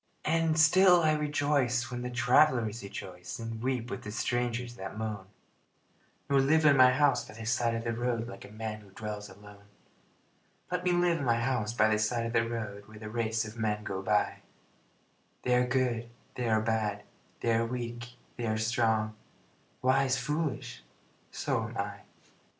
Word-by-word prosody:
And 160 0 +2
still 180 +2 +6
I 155 -1 +3
rejoice 145 -5 +1
when 120 0 -4
the 125 - -3
travelers 125 -2 +3
rejoice 90 -2 -7
And 115 -1 -6
weep 125 -1 -2
with - - -4
the 105 - -7
strangers 120 +2 -1
that 95 -1 -7
moan, 105 -3 -4 1.0
Nor 140 -1 +3
live 155 +3 +3
in 145 -2 +7
my 130 -1 +7
house 140 0 +3
by 110 - -12
the 115 0 -8
side 115 0 +1
of 115 - -3
the 115 0 -1
road 115 0 -1
Like - - -9
a - - -11
man 110 0 -5
who 100 - -17
dwells 105 +1 -6
alone. 100 +1 -15 1.1
Let 180 0 -1
me 180 - +2
live 175 -1 +2
in - - -3
my 120 -2 +2
house 115 -3 0
by 110 -2 +3
the 105 -1 +2
side 115 +2 0
of 115 - -4
the 115 -1 +2
road, 105 -3 -5
Where 110 0 -13
the 110 0 -8
race 110 -1 0
of 110 +2 -9
men 105 -1 -1
go 95 -2 -4
by - - +1 1.1
They 125 - +2
are 125 0 +3
good, 120 -2 0 0.2
they 125 -2 -2
are 110 -1 +3
bad, 110 -2 -1 0.4
they 115 - +2
are 115 0 +2
weak, 120 0 -5 0.2
they 120 -1 -2
are 110 0 0
strong, 110 -1 +1 0.7
Wise, 130 +1 +3
foolish 135 -2 -3 0.5
so - - -1
am - - -9
I. - - -3
115 Hz, 180 wpm, -30 LUFS, 110-130 Hz, 1.1 s, in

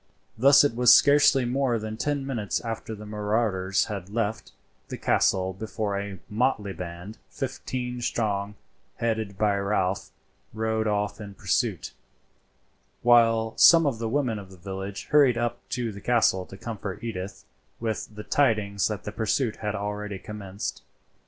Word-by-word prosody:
Thus 140 +5 +6
it 145 -5 +1
was 125 0 +6
scarcely 140 -2 +6
more 125 -1 +1
than 110 0 -5
ten 145 +4 -2
minutes 115 -7 -2
after 115 -1 -5
the 105 0 -10
marauders 105 -2 0
had 100 -3 -6
left 110 0 -2 0.4
the - - -6
castle 95 0 +2
before 105 +1 -3
a 100 -1 -4
motley 105 -3 0
band, 90 +4 -8
fifteen 125 +1 -4
strong, 105 -3 -1 0.4
headed 110 -4 -2
by 105 -1 +2
Ralph, 100 -1 -1 0.5
rode 110 0 0
off 105 0 -1
in 100 -1 -9
pursuit, - - -1 1.1
while 115 -2 +4
some 165 -1 +8
of 130 -6 0
the 115 -1 -2
women 125 -4 0
of 100 -2 -11
the 95 - -14
village 95 +2 -6
hurried 140 -5 +5
up 120 0 -1
to 120 -2 -2
the 100 -1 -10
castle 100 -6 +2
to 95 - -11
comfort 105 -3 -6
Edith 100 -4 -6 0.3
with 110 -2 -4
the 105 - -7
tidings 105 -8 +1
that 105 -3 -4
the 105 - -5
pursuit 110 +2 0
had 105 -1 -3
already 105 0 -4
commenced. 100 0 -6
110 Hz, 150 wpm, -26 LUFS, 100-120 Hz, 1.1 s, some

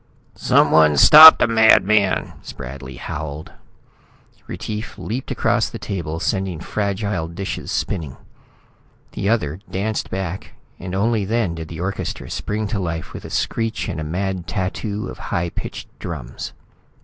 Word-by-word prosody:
"Someone 75 -2 +4
stop 155 - +11
the - - +3
madman!" 110 -3 +3
Spradley 65 0 -9
howled. 75 0 -6 1.0
Retief 110 +1 -6
leaped 125 +5 -5
across 120 -1 +1
the 115 - -7
table, 85 -7 -4
sending 95 -1 -2
fragile 100 -2 -2
dishes 95 +4 -5
spinning. 80 -9 -3 0.9
The 100 - -2
other 90 -8 0
danced 105 +3 -2
back, 95 -1 -5 0.3
and 90 +1 -5
only 110 +2 +1
then 105 -3 0
did 80 -1 -7
the 80 0 -7
orchestra 95 +1 -4
spring 105 +1 -3
to 105 -1 -2
life 85 -3 -4
with - - -8
a - - -7
screech 115 -1 -2
and - - -4
a - - -3
mad 90 +2 -3
tattoo 105 +3 -3
of - - -9
high 85 -3 -1
pitched - - -7
drums. 75 -8 -7
95 Hz, 135 wpm, -20 LUFS, 80-110 Hz, 1.0 s, stop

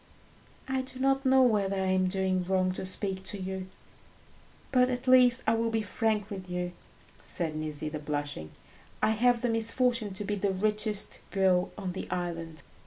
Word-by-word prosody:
"I 265 0 0
do 260 0 -9
not 270 0 +2
know 265 0 +6
whether 205 -5 +2
I 190 - 0
am 185 0 +2
doing 185 -1 0
wrong 185 0 +1
to 185 - -5
speak 190 0 -1
to 205 - 0
you, 190 0 -5 1.0
but 250 -1 +4
at 250 +1 -3
least 255 -1 +6
I 220 - +3
will 230 0 +1
be 225 -1 -1
frank 210 -1 -1
with 190 -2 -7
you," 180 0 -3 0.5
said 160 -3 +1
Nisida, 155 0 -3
blushing; 145 - -4 0.5
"I - - +4
have 240 +2 +2
the - - +2
misfortune 230 -2 +2
to 205 - -3
be 205 - -2
the 200 -1 0
richest 210 +1 0
girl 185 -2 +2
on 190 -3 -4
the 185 - -6
island." 170 -3 -4
195 Hz, 175 wpm, -29 LUFS, 185-230 Hz, 1.0 s, know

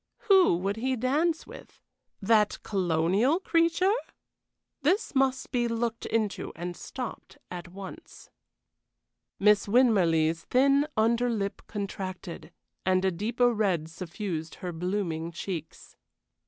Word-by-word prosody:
Who 375 - +6
would 195 +4 -2
he 260 +3 0
dance 300 +7 0
with? - - -13 0.4
That 210 0 +3
colonial 190 - +2
creature? 335 +2 +2 0.9
This 380 +10 +1
must 265 -1 +1
be 240 -2 +1
looked 230 0 -2
into 215 -3 -1
and 175 +1 -5
stopped 250 +5 -7
at 180 0 -6
once. 195 - -11 1.1
Miss 210 0 +4
Winmarleigh's 170 -9 +3
thin 275 +3 +3
under 235 +2 +3
lip 200 -4 -2
contracted, 190 -4 -6 0.3
and 185 0 +2
a 190 - +3
deeper 235 +7 +1
red 185 -8 0
suffused 165 -2 -5
her 180 - -5
blooming 170 -1 -2
cheeks. 170 -1 -7
210 Hz, 115 wpm, -28 LUFS, 180-250 Hz, 1.1 s, Who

